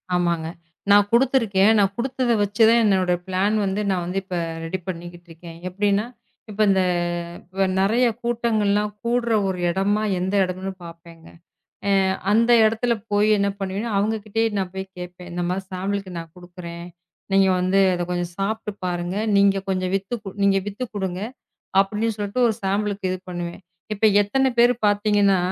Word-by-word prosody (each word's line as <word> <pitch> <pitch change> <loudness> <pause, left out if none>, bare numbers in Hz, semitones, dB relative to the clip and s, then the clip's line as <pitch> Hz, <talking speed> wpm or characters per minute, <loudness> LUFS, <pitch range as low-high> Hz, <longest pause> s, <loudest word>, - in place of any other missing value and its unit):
ஆமாங்க. 170 -2 0 0.4
நான் 205 0 +6
குடுத்திருக்கேன். 230 -5 +3
நான் 195 -1 +2
குடுத்தத 255 0 -1
வச்சு 205 +2 -2
தான் 235 +1 +5
என்னோட 190 -4 +2
ப்ளான் 190 +3 +1
வந்து 195 +2 -1
நான் 180 -1 -2
இப்ப 185 -1 -6 0.3
ரெடி 165 +3 -3
பண்ணிக்கிட்டு 175 -1 -7
இருக்கேன். 165 0 -11
எப்படின்னா, 200 +2 +1 0.5
இப்ப 210 +1 -3
இந்த 190 -1 +3 1.0
நிறைய 225 +6 +3 0.2
கூட்டங்கள் 235 -3 0
எல்லாம் 210 +1 0
கூடுற 235 0 0
ஒரு 185 -1 -2
இடமா 200 +4 +1 0.2
எந்த 190 +3 -1
இடம்னு 185 +1 -4
பார்ப்பேங்க. 165 -1 -13 0.6
அ - - +3 0.4
அந்த 230 +2 +3
இடத்துல 225 +2 +2 0.2
போய் 205 +1 +3
என்ன 200 0 +1
பண்ணுவேன்? 195 +4 -3
அவங்ககிட்டயே 215 +2 0
நான் 185 -2 -3
போய்க் 190 0 -7
கேட்பேன். 180 0 -9
இந்த 175 0 -3
மாரி 190 +1 -2
ஷாம்பிள்க்கு 190 0 -3
நான் 165 -1 -9
குடுக்கறேன். 175 -1 -9 0.5
நீங்க 195 0 +5
வந்து 185 +2 +2 0.2
அதை 175 - -2
கொஞ்சம் 175 -1 -2
சாப்ட்டு 210 +2 -2 0.2
பாருங்க. 175 +1 -3 0.2
நீங்க 200 0 +4
கொஞ்சம் 185 -1 -1
வித்து 195 +4 -4 0.3
நீங்க 200 0 +4
வித்துக் 210 +4 -5
குடுங்க 190 -2 -3 0.6
அப்படின்னு 215 +3 0
சொல்லிட்டு 205 +4 -1
ஒரு 220 - 0
ஷாம்பிள்க்கு 200 0 -1
இது 185 - -3
பண்ணுவேன். 175 +1 -6 0.3
இப்ப 215 +2 +2 0.2
எத்தனை 265 +6 +1
பேர் 240 +1 +6
பாத்தீங்கன்னா 205 -1 +3
195 Hz, 150 wpm, -22 LUFS, 180-210 Hz, 1.0 s, நான்